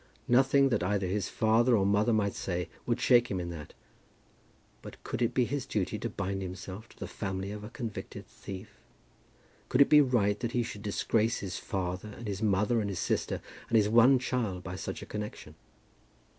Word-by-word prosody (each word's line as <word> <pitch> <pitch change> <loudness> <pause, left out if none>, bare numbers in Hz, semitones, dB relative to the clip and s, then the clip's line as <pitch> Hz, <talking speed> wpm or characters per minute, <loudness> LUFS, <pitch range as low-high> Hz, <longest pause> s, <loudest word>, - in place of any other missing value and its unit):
Nothing 135 +2 +5
that 115 -7 +1
either 95 +2 0
his 95 +2 -1
father 115 +2 +3
or 95 - +2
mother 105 +3 +3
might 105 -3 +1
say 90 -2 -3 0.2
would 120 0 +1
shake 120 -1 +4
him 95 - -1
in 85 -1 -4
that. 75 -3 -9 1.1
But - - -11
could - - -4
it 120 0 +2
be 125 - +3
his 140 +1 -3
duty 100 -4 -1
to - - -3
bind 95 +1 -3
himself 95 +3 -7
to - - -19
the - - -5
family 95 -1 -4
of 105 0 -7
a 105 - -7
convicted 120 -3 -6
thief? 100 +2 -10 0.9
Could 125 - +1
it 140 - +7
be 150 -1 +8
right 105 -7 +2
that 120 -2 -3
he 120 - +2
should 105 -3 -7
disgrace 110 +2 0
his 95 -3 -4
father 95 +2 -3
and 120 - -7
his 100 0 -3
mother 105 +2 +2
and 100 - -2
his 95 - -4
sister - - -1 0.3
and 115 - +1
his 105 -1 +3
one 120 +4 +6
child 115 -7 -2
by 90 0 -5
such - - -5
a - - -7
connection? 105 0 -6
105 Hz, 200 wpm, -30 LUFS, 95-120 Hz, 1.1 s, be